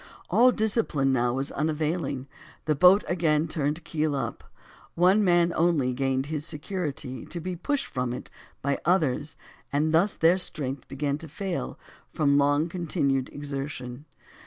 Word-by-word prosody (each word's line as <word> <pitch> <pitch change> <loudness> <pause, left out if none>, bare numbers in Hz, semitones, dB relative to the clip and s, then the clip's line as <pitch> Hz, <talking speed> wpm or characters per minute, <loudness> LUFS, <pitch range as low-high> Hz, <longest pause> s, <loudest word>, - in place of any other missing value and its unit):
All 250 +2 +6
discipline 210 - +1
was 125 +2 0
now - - -10
unavailing, 155 -3 -1 0.4
the 155 - +2
boat 180 +7 +6
again 160 -3 +1
turned 155 +1 -2
keel 155 -3 -1
up; 135 - -4 0.5
one 185 +5 +4
man 175 -2 +3
only 160 -7 +2
gained 135 +1 0
his 150 0 -3
security 150 - -4
to 170 - -5
be 180 +2 -4
pushed 280 - -1
from 125 -2 -3
it 125 - -7 0.3
by 140 0 0
others 155 -5 +1 0.3
and 155 +3 +1
thus 180 +5 +3
their 170 +3 +4
strength 135 -7 -2
begun 140 +1 -2
to 160 - -8
fail 150 - -4 0.4
from 140 -2 +3
long 145 +3 +3
continued 140 -6 -1
exertion. 140 -2 -6
150 Hz, 145 wpm, -27 LUFS, 135-175 Hz, 0.5 s, All